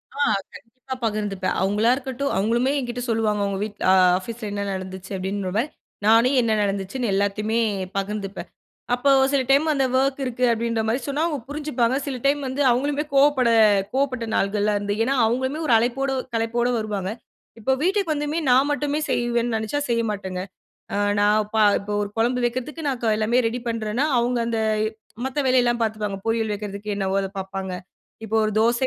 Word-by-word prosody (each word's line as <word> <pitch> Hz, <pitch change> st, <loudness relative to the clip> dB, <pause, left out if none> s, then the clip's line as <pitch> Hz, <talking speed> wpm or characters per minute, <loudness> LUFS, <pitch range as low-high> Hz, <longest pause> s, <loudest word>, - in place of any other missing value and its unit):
ஆ -, -, -8 dB, 0.3 s
கண்டிப்பா 255 Hz, +3 st, -9 dB
பகிர்ந்துப்பேன். 205 Hz, -3 st, -1 dB
அவுங்களா 210 Hz, +4 st, +2 dB
இருக்கட்டும் 270 Hz, +1 st, -3 dB
அவுங்களுமே 235 Hz, +6 st, +1 dB
என்கிட்டே 245 Hz, -1 st, -4 dB
சொல்லுவாங்க, 215 Hz, -2 st, +1 dB
உங்க 195 Hz, -, -2 dB
வீட்ல- 210 Hz, -1 st, -6 dB
ஆ -, -, +6 dB, 0.2 s
ஆஃபீஸ் 230 Hz, +5 st, -7 dB
ல -, -, -2 dB
என்ன 200 Hz, 0 st, -2 dB
நடந்துச்சு? 190 Hz, +1 st, -7 dB
அப்பிடின்றமாரி 195 Hz, +2 st, -1 dB, 0.4 s
நானே 230 Hz, +4 st, +5 dB
என்ன 230 Hz, -, 0 dB
நடந்துச்சுன்னு 200 Hz, +4 st, -2 dB
எல்லாத்தையுமே 210 Hz, +3 st, 0 dB, 0.4 s
பகிர்ந்துப்பேன். 195 Hz, 0 st, -4 dB, 0.4 s
அப்போ 275 Hz, +3 st, +3 dB, 0.2 s
சில 275 Hz, -2 st, +2 dB
டைம் 280 Hz, +3 st, +5 dB
அந்த 270 Hz, -2 st, +1 dB
ஒர்க் 270 Hz, +1 st, 0 dB
இருக்கு 250 Hz, 0 st, -3 dB
அப்பிடின்றமாரி 230 Hz, +1 st, 0 dB
சொன்னா 285 Hz, +3 st, 0 dB
அவுங்க 300 Hz, -4 st, -2 dB
புரிஞ்சுப்பாங்க, 275 Hz, -5 st, 0 dB
சில 270 Hz, -3 st, -3 dB
டைம் 285 Hz, +1 st, +3 dB
வந்து 265 Hz, +3 st, -2 dB
அவங்களுமே 285 Hz, +4 st, 0 dB
கோவப்பட 275 Hz, -3 st, +4 dB, 0.4 s
கோவப்பட்ட 260 Hz, -3 st, 0 dB
நாள்கள்லாம் 205 Hz, +1 st, +1 dB
இருந்து 205 Hz, 0 st, -2 dB
ஏன்னா 270 Hz, +3 st, +1 dB
அவுங்களுமே 260 Hz, +6 st, -1 dB
ஒரு 235 Hz, -, +4 dB
அழைப்போட, 255 Hz, +4 st, 0 dB, 0.2 s
களைப்போட 235 Hz, +2 st, 0 dB
வருவாங்க. 205 Hz, -3 st, -3 dB, 0.5 s
இப்போ 225 Hz, +4 st, 0 dB
வீட்டுக்கு 380 Hz, -1 st, +1 dB
வந்துமே 295 Hz, +2 st, -2 dB
நான் 265 Hz, +3 st, +4 dB
மட்டுமே 290 Hz, 0 st, -1 dB
செய்வேன்னு 240 Hz, -1 st, 0 dB
நினைச்சா, 220 Hz, +6 st, -2 dB
செய்ய 230 Hz, 0 st, +2 dB
மாட்டேங்க. 190 Hz, -3 st, -4 dB, 0.5 s
அ -, -, 0 dB, 0.2 s
நான் 210 Hz, +1 st, +3 dB
ப -, -, +1 dB, 0.2 s
இப்போ 205 Hz, +1 st, -6 dB
ஒரு 205 Hz, -, -4 dB
குழம்பு 245 Hz, +2 st, +1 dB
வைக்கிறதுக்கு 255 Hz, +6 st, -3 dB
நான் 255 Hz, -3 st, -3 dB
எல்லாமே 225 Hz, +3 st, +2 dB
ரெடி 235 Hz, +2 st, -2 dB
பண்ணுறேன்னா, 230 Hz, +4 st, -1 dB
அவுங்க 240 Hz, +1 st, +1 dB
அந்த 230 Hz, -1 st, -1 dB, 0.6 s
மத்த 265 Hz, +2 st, -3 dB
வேலையெல்லாம் 245 Hz, -2 st, +3 dB
பார்த்துப்பாங்க. 210 Hz, -3 st, -2 dB
பொரியல் 225 Hz, -1 st, 0 dB
வைக்கிறதுக்கு 205 Hz, 0 st, -5 dB
என்னவோ 195 Hz, -1 st, -1 dB
அதை 195 Hz, -, -4 dB
பார்ப்பாங்க, 190 Hz, 0 st, -5 dB, 0.5 s
இப்போ 220 Hz, -, -1 dB
ஒரு 215 Hz, -, -2 dB
தோசை 235 Hz, +3 st, +2 dB
230 Hz, 160 wpm, -23 LUFS, 210-260 Hz, 0.6 s, ஆ